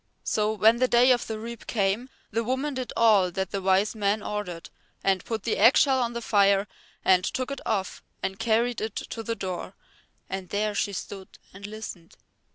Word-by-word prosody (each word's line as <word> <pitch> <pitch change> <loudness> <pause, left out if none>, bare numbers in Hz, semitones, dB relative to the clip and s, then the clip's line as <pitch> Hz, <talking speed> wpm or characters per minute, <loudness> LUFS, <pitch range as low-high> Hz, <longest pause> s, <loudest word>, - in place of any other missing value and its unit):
So 215 0 0
when 220 +2 +4
the 255 +1 +3
day 245 +1 +5
of 245 -1 +1
the 220 - -4
reap 230 +1 -8
came 210 +4 0 0.2
the 230 +2 0
woman 260 +5 -1
did 255 -1 -4
all 210 -5 +5
that 190 +1 -3
the 195 - -2
Wise 190 +2 +2
Man 210 -1 0
ordered, 190 -5 -5 0.3
and 190 -2 +2
put 220 -3 -4
the 230 - 0
eggshell 260 +4 +5
on 240 -1 -1
the 235 0 -5
fire 200 -1 +3 0.4
and 185 -1 +5
took 255 +7 -2
it 275 - -5
off 195 -4 -2 0.2
and 190 +1 -3
carried 230 +1 +1
it 220 -1 -4
to 225 - -5
the 230 +1 -3
door, 185 -2 -5 0.5
and 190 -1 -5
there 210 +1 0
she 205 - 0
stood 195 +1 -7 0.2
and 200 +1 -8
listened. 205 -5 -9
215 Hz, 190 wpm, -26 LUFS, 195-235 Hz, 0.5 s, day